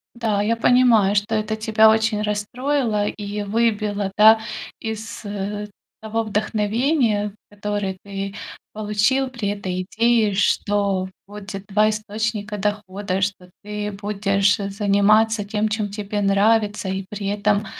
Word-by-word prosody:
Да, 220 -4 0
я 230 +2 +1
понимаю, 230 -4 +4
что 210 +2 0
это 215 0 -1
тебя 220 0 +4
очень 220 -1 +2
расстроило 215 +1 -1
и 205 0 -4
выбило, 210 -2 0
да, 220 +1 +8 0.4
из, 220 -1 -6
э, 205 +1 -4 0.3
того 220 +1 -1
вдохновения, 215 +1 0 0.2
которое 205 -2 -3
ты 195 0 -5 0.4
получил 215 +6 +1
при 235 -5 -4
этой 185 -3 -3
идее, 225 +1 +2
что 200 -1 +1 0.2
будет 200 -1 -8
два 215 +1 +3
источника 215 0 -3
дохода, 200 -1 -2
что 190 -2 -3
ты 210 0 -4
будешь, 200 0 +1
э, 200 -1 -3
заниматься 205 +2 +3
тем, 210 +1 -1
чем 210 -1 -2
тебе 205 0 -3
нравится 205 +1 +2
и 190 0 -3
при 205 -1 -5
этом 205 +1 +1
210 Hz, 130 wpm, -22 LUFS, 200-220 Hz, 0.4 s, да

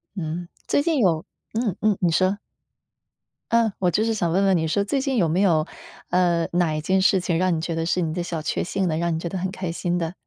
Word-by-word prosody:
嗯， 170 0 -4 0.2
最 285 - +2
近 325 0 +1
有 175 -10 +2 0.3
嗯 220 -5 -1
嗯， 215 -2 +3
你 175 -2 +3
说。 185 +4 +2 1.2
嗯， 230 -2 +3
我 180 -2 +2
就 215 +6 +1
是 225 - +1
想 175 -6 0
问 195 +3 +2
问 190 -1 +4
你 160 -1 +1
说， 200 +6 +1
最 270 +6 0
近 270 -3 -1
有 170 -5 +3
没 170 +5 +1
有， 165 -5 +3 0.4
呃， 175 -2 +2
哪 175 -3 +2
一 155 - -1
件 185 +5 +1
事 190 0 +4
情 175 -2 -1
让 185 0 +2
你 160 - -1
觉 165 0 -3
得 165 0 -1
是 180 +2 0
你 160 -3 -1
的 175 0 -2
小 165 -2 -4
确 - - -1
幸 190 +1 -1
的， 155 - 0
让 170 0 0
你 160 - -2
觉 170 - -4
得 190 - -4
很 185 +1 -2
开 185 -2 -4
心 175 0 -1
的， 165 -1 -2
180 Hz, 275 characters per minute, -23 LUFS, 165-195 Hz, 1.2 s, 问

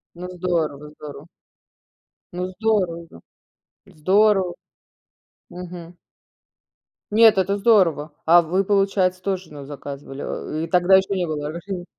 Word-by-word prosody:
Ну, 180 +1 -7
здорово, 170 -5 -1
здорово. 150 -1 -11 1.1
Ну, 180 +1 -3
здорово 185 -4 -1
же. 85 - -14 0.7
Здорово. 190 +2 +2 1.0
Мгм. 175 -1 -9 1.2
Нет, 220 0 +6
это 195 +1 +1
здорово. 185 -8 +3
А 170 +2 +7
вы, 180 +4 0
получается, 195 -2 +1
тож 190 -1 -2
назаказывали, 140 -1 -9
э, 155 +1 -4
ы - - -6
тогда 180 +2 +5
ещё 190 +1 0
не 180 -2 -1
было 150 -2 -4
разрешений. 175 +2 -6
180 Hz, 115 wpm, -22 LUFS, 160-195 Hz, 1.2 s, А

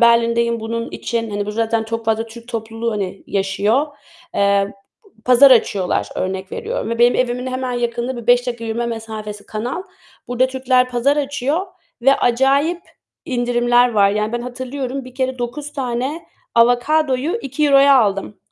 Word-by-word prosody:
Berlin'deyim 235 0 +3
bunun 230 +1 -4
için, 230 -2 -3
hani, 205 0 -3
burada 210 +1 -5
zaten 225 0 0
çok 230 +1 -4
fazla 225 0 0
Türk 230 +1 -13
topluluğu, 225 0 -3
hani, 195 -2 -4
yaşıyor, 200 +7 +1 0.5
eee, 200 0 +2 0.5
pazar 255 +2 +7
açıyorlar, 205 -6 +2
örnek 190 0 -3
veriyorum. - - -3
Ve 230 - -2
benim 240 +1 +5
evimin 250 0 -1
hemen 255 0 -3
yakınında 240 +1 -2
bir - - -16
5 245 +1 +4
dakika 240 -2 -4
yürüme 230 +1 -2
mesafesi, 220 -2 -6
kanal, 240 +11 -4 0.5
burada 245 +1 +2
Türkler 255 -1 +1
pazar 250 +4 +2
açıyor 285 +5 -1 0.4
ve 275 +2 +6
acayip 275 +8 +2 0.4
indirimler 245 -1 +2
var. 200 -2 +4
Yani 210 +2 -1
ben 240 - -1
hatırlıyorum, 260 +1 -5
bir 255 -1 -12
kere 260 -1 -2
9 280 +5 -5
tane 260 +4 -3 0.3
avokadoyu 265 - +2
€2'ya 275 0 +4
aldım. 200 -2 0
240 Hz, 150 wpm, -19 LUFS, 225-260 Hz, 0.5 s, pazar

